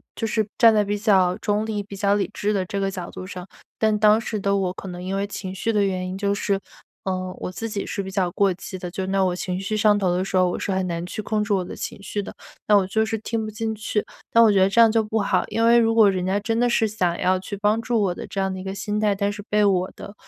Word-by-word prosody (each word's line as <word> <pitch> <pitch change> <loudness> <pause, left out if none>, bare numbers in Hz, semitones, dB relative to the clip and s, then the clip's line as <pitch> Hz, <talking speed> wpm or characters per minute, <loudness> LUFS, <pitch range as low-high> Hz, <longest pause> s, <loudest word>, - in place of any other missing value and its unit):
就 225 - -2
是 220 -1 0
站 230 -2 +7
在 210 - +3
比 205 0 -2
较 190 -4 +3
中 210 0 0
立， 215 -2 -3
比 200 0 -10
较 200 +1 +2
理 205 - 0
智 205 - -1
的 190 -2 0
这 200 +2 -3
个 195 - 0
角 185 -3 -6
度 185 - -8
上。 185 -1 -8 0.3
但 215 -1 +2
当 215 +1 +5
时 225 -2 -4
的 200 0 +1
我 185 -2 -1
可 195 - -9
能 180 0 -7
因 190 +1 -3
为 200 +1 -1
情 190 -2 -6
绪 210 +4 -1
的 210 -2 +2
原 185 -1 -2
因， 185 - -5
就 200 0 0
是， 200 -1 0 0.5
呃， 185 -1 -2
我 - - -4
自 225 +5 -5
己 205 -2 -3
是 200 - -3
比 190 - -7
较 185 -2 0
过 195 0 +2
激 185 +2 -8
的， 180 -1 -6
就 190 +1 -3
因 190 - -4
为 195 - +2
我 185 -2 +2
情 180 0 -3
绪 195 +3 -3
上 210 -1 +4
头 185 -3 +1
的 185 - 0
时 195 - -4
候， 185 - +4
我 - - -3
是 - - -4
很 190 0 0
难 170 -1 -3
去 200 - -5
控 215 0 -1
制 210 - 0
我 190 -2 +1
的 - - -8
情 - - -6
绪 205 - -3
的， 200 - -9 0.3
那 210 - +5
我 195 - +2
就 220 +3 +1
是 225 0 -2
听 220 +1 -3
不 215 - -5
进 220 +1 -3
去， 210 0 -2 0.3
那 230 0 +7
我 220 - +6
觉 200 - +3
得 190 +1 +4
这 215 +4 +1
样 225 - +6
就 225 0 +3
不 215 +1 -1
好。 200 - +1
因 230 - 0
为 235 +1 +6
如 225 0 +2
果 215 -3 +6
人 185 -1 -2
家 190 +2 +1
真 225 +2 -1
的 245 0 +3
是， 225 -2 +2
想 180 -5 0
要 185 0 +2
去 195 +2 -6
帮 210 +3 +1
助 235 -2 0
我 190 -3 +1
的 - - -8
这 195 - -5
样 190 0 -1
的 190 - -6
一 - - -7
个 190 0 -5
心 210 +1 -2
态， 210 -2 +2
但 200 +1 0
是 205 - -7
被 210 0 +3
我 185 -2 +2
的 200 - -9
200 Hz, 330 characters per minute, -23 LUFS, 185-215 Hz, 0.5 s, 站